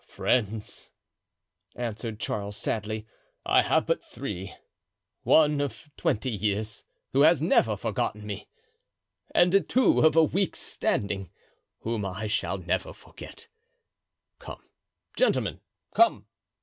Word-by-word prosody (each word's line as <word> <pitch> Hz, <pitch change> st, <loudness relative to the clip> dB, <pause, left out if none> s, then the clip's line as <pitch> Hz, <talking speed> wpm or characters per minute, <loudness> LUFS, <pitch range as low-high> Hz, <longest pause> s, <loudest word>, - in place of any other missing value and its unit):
"Friends!" 110 Hz, -3 st, -1 dB, 0.9 s
answered 115 Hz, -2 st, -4 dB
Charles, 100 Hz, -2 st, -3 dB
sadly, 110 Hz, 0 st, -3 dB, 0.4 s
"I -, -, +5 dB
have -, -, +2 dB
but -, -, 0 dB
three—one 145 Hz, -, -1 dB
of 145 Hz, +1 st, -5 dB
twenty 125 Hz, +4 st, 0 dB
years, 105 Hz, +1 st, -2 dB, 0.3 s
who 135 Hz, -, +4 dB
has 160 Hz, 0 st, +6 dB
never 115 Hz, -, +3 dB
forgotten 105 Hz, +1 st, -2 dB
me, 105 Hz, -1 st, -6 dB, 0.9 s
and 180 Hz, +3 st, +5 dB
two 260 Hz, +1 st, +4 dB
of 155 Hz, -1 st, +5 dB
a 165 Hz, -, +7 dB
week's 185 Hz, +4 st, 0 dB
standing, 100 Hz, -2 st, -2 dB, 0.5 s
whom 115 Hz, -2 st, -2 dB
I 95 Hz, +2 st, -4 dB
shall 100 Hz, -3 st, -1 dB
never 90 Hz, -2 st, -2 dB
forget. 455 Hz, +1 st, -13 dB, 0.9 s
Come, -, -, -10 dB, 0.5 s
gentlemen, -, -, +1 dB, 0.3 s
come!" 345 Hz, 0 st, +4 dB
110 Hz, 110 wpm, -27 LUFS, 105-150 Hz, 0.9 s, a